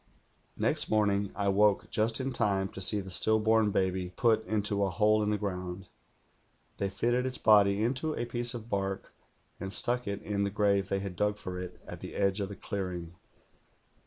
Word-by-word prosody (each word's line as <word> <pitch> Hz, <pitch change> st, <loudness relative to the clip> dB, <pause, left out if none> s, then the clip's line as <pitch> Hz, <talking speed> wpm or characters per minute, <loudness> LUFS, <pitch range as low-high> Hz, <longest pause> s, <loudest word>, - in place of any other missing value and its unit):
"Next -, -, -1 dB
morning 100 Hz, -2 st, +1 dB
I 100 Hz, -1 st, 0 dB
woke 100 Hz, 0 st, +2 dB
just 110 Hz, +1 st, 0 dB
in 130 Hz, 0 st, -2 dB
time 100 Hz, -4 st, 0 dB
to 95 Hz, -, -8 dB
see 105 Hz, +2 st, +4 dB
the 95 Hz, -1 st, -9 dB
still 110 Hz, +4 st, +4 dB
born 110 Hz, 0 st, +3 dB
baby 95 Hz, -2 st, 0 dB
put 110 Hz, -2 st, +2 dB
into 105 Hz, -1 st, 0 dB
a 100 Hz, -, +1 dB
hole 105 Hz, +4 st, +3 dB
in 105 Hz, -, 0 dB
the 105 Hz, -, +1 dB
ground. 90 Hz, -2 st, -5 dB, 0.9 s
They 100 Hz, -, -1 dB
fitted 120 Hz, +6 st, 0 dB
its 130 Hz, -, -4 dB
body 105 Hz, -1 st, +4 dB
into 135 Hz, +6 st, -1 dB
a -, -, -2 dB
piece 120 Hz, +1 st, -2 dB
of 115 Hz, -1 st, -7 dB
bark, 95 Hz, -3 st, -3 dB, 0.5 s
and 95 Hz, +1 st, -5 dB
stuck 125 Hz, +3 st, +3 dB
it 100 Hz, 0 st, -4 dB
in 100 Hz, -1 st, -1 dB
the 100 Hz, -, 0 dB
grave 100 Hz, -1 st, +1 dB
they 100 Hz, 0 st, -1 dB
had 95 Hz, -2 st, -5 dB
dug 105 Hz, +2 st, 0 dB
for 90 Hz, -3 st, -6 dB
it 90 Hz, 0 st, -8 dB
at -, -, -8 dB
the -, -, -8 dB
edge 100 Hz, 0 st, +1 dB
of 100 Hz, -, -3 dB
the 100 Hz, -, -7 dB
clear 95 Hz, -3 st, -4 dB
ing. 85 Hz, -1 st, -7 dB
100 Hz, 200 wpm, -30 LUFS, 95-110 Hz, 0.9 s, see